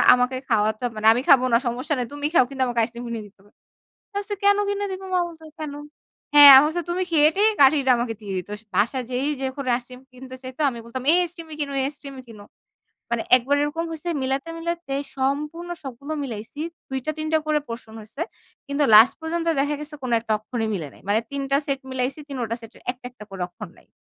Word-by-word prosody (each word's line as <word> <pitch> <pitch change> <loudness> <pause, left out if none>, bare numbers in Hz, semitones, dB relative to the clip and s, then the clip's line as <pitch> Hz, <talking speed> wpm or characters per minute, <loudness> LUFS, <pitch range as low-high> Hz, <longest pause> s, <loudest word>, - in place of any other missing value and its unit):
আমাকে 250 +1 0
খাওয়াতে 215 0 +1
হবে 225 -3 -4
না। - - +5
আমি 245 - 0
খাবো 260 -2 +7
না, - - +7
সমস্যা 250 +5 -2
নাই। 245 - -1
তুমি 290 0 -4
খাও। 295 - +6
কিন্তু 270 -1 -1
আমাকে 240 -1 -1
আইসক্রিম 235 +1 -5
কিনে 230 -2 -4
দিতে 200 - -25
হবে।" 205 +1 -24 0.6
বলছে, 405 +1 -3
"কেন 405 0 +5
কিনে 405 0 -1
দিবো?" 380 0 -6
মা 365 - +3
বলতো, 325 -1 -13 0.2
"কেন?" 300 -2 -5 0.6
হ্যাঁ। 290 -1 +11
আমি 270 - +7
বলছি, 345 +3 -2
"তুমি 360 +2 -1
খেয়ে-টেয়ে 325 +8 +4
কাঠিটা 270 -1 +5
আমাকে 235 -1 -2
দিয়ে 200 -2 -6
দিত।" 180 +2 -6 0.3
বাসায় 245 +5 +1
যেই 255 +3 -1
যখন 265 +1 -3
আইসিইক্রিম 250 +1 -8
কিনতে 260 +1 -10
চাইত 255 -1 -9
আমি 240 -3 -8
বলতাম, 250 +2 -6
"এই 350 - +5
আইসিইক্রিম 340 -1 -7
কিনো 285 -1 -2
এই 265 - +1
আইসক্রিমই 275 -2 -9
কিনো।" 210 -3 -12 0.7
মানে 235 -1 0
একবার 270 +4 +1
এরকম 315 +3 -2
হইছে 325 +2 -6
মিলাতে, 270 +4 -1
মিলাতে 340 -3 -4 0.2
সম্পূর্ণ 300 +6 -2
সবগুলো 275 +3 -7
মিলাইছি। 230 +3 -7 0.3
২ 265 - -1
টা, - - +1
৩ 310 - -3
টা 315 - +5
করে 305 -1 +2
portion 230 -1 -8
হইছে। 215 +7 -12 0.5
কিন্তু 280 +1 0
লাস্ট 220 +4 +8
পর্যন্ত 330 +1 -3
দেখা 290 +1 0
গেছে 300 0 -8
কোন 255 - -3
একটা 225 -1 -2
অক্ষরই 225 +1 -3
মিলে 160 -6 -4
নাই। - - -18
মানে 210 +2 +3
৩ 280 0 -3
টা 275 - +4
সেট 275 -2 -1
মিলাইছি। 260 +3 -2
৩ 275 -3 -5
টা 230 - -1
সেটের 225 +1 -14
১ 245 - -7
টা, - - -45
১ 250 - -24
টা 210 - -7
করে 190 -2 -5
অক্ষর 195 +2 -10
নাই, - - -22
265 Hz, 220 wpm, -23 LUFS, 235-300 Hz, 0.7 s, হ্যাঁ